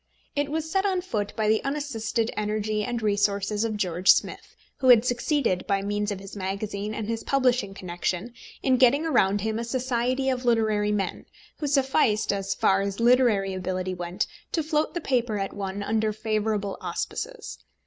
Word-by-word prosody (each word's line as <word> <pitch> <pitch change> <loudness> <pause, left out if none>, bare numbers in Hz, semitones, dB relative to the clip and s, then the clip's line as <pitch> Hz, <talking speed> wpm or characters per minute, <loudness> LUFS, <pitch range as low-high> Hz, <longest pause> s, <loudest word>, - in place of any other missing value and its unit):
It 285 0 0
was 320 +1 -2
set 385 +4 +1
on 380 -3 +1
foot 210 - -3
by 220 -2 0
the 220 +1 +2
unassisted 265 -5 -2
energy 210 0 -1
and 240 -1 -3
resources 205 0 +1
of 220 -2 -1
George 180 -2 0
Smith, - - +3 0.2
who 265 - 0
had 245 -2 +7
succeeded 245 - 0
by 200 -1 +1
means 205 +1 -1
of 200 - -4
his 195 +1 -10
magazine 200 +2 -3
and 220 - -3
his 230 0 -3
publishing 250 -7 +1
connection 180 +5 -3 0.3
in 260 -1 +3
getting 270 +5 +4
around 205 -10 +2
him 220 +1 -1
a - - -2
society 255 +1 -1
of 255 -1 0
literary 215 -3 +2
men 195 -3 -2 0.3
who 295 - -2
sufficed, 265 -7 +2
as 195 -1 -2
far 195 0 +3
as 200 +1 -3
literary 230 -5 +3
ability 185 0 -3
went, 175 +2 -2 0.3
to 325 - +1
float 310 +2 0
the 345 - -2
paper 245 -6 0
at 195 -1 -3
once 200 0 -4
under 220 0 +1
favourable 215 -2 -2
auspices. - - -5
215 Hz, 175 wpm, -26 LUFS, 200-255 Hz, 0.3 s, had